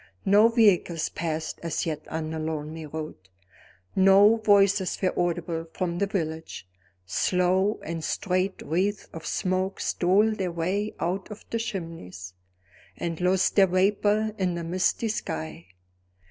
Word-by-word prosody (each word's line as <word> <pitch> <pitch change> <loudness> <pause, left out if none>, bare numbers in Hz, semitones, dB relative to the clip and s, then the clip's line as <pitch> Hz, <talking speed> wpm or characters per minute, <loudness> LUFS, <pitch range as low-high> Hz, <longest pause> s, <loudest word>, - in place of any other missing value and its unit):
No 205 +3 +6
vehicles 200 -8 +3
passed 160 -1 -4
as 165 -1 -2
yet 155 -2 -4
on 160 0 -4
the 160 - -4
lonely 155 0 -4
road; 155 +1 -6 0.8
no 195 +3 +6
voices 200 -3 +3
were 185 - +1
audible 170 -1 -1
from 175 -2 -2
the 200 - +1
village; 160 - -4 0.4
slow 180 - +1
and 165 0 -5
straight 185 +2 -1
wreaths 195 +5 -1
of 165 - -7
smoke 185 +1 -1
stole 200 +5 +2
their 190 -4 -2
way 185 +6 -2
out 185 +3 -2
of 210 0 -10
the 230 - 0
chimneys, 165 - -6 0.6
and 170 0 -4
lost 185 +1 +2
their 195 -2 +6
vapor 205 +3 +2
in 180 -2 0
the 170 - -4
misty 185 +6 0
sky. 80 - -4
180 Hz, 135 wpm, -26 LUFS, 160-200 Hz, 0.8 s, No